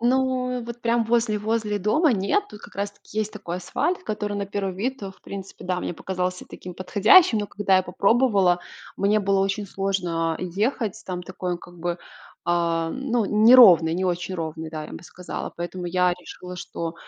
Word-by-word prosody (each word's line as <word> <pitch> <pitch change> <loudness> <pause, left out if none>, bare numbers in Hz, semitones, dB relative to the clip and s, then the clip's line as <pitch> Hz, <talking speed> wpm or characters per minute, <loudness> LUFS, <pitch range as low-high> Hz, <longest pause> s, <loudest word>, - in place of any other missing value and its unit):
Ну, 250 0 +1
вот 235 +1 -8
прям 235 0 +2
возле 225 -2 +1
возле 215 0 -1
дома 255 - +3
нет. 210 - +1
Ту 210 - -11
как - - -14
раз-таки 205 +1 -5
есть 215 0 -1
такой 175 -5 -5
асфальт, 345 - -2
который 210 -1 -3
на 200 -1 -3
первый 195 -2 -3
вид, 255 +5 -3
о 195 - -5
в - - -20
принципе, 195 -1 -9
да, 180 0 -1
мне - - -3
показался 180 0 -3
таким 180 -1 -9
подходящим, 215 - +5
но, 205 - -2
когда 200 -2 +2
я 185 - +3
попробовала, 195 -1 +2 0.4
мне 205 +2 +2
было 195 -1 +2
очень 195 +1 -1
сложно 180 -4 -1
ехать. 205 +4 -2
Там 180 -1 -4
такой 185 -1 -4
он, 175 - -3
как 175 0 -14
бы, 175 +1 -2 0.5
а, 170 -1 +1
ну, 245 -3 -1
неровный, 210 -7 +7
не 185 +2 -1
очень 180 +1 -2
ровный, 160 -1 -5
да, 155 -1 -5
я - - -10
бы - - -8
сказала. 175 +2 -7
Поэтому 175 +1 -5
я 180 0 +2
решила, 180 0 -10
что 165 -1 -5
195 Hz, 185 wpm, -24 LUFS, 180-220 Hz, 0.5 s, неровный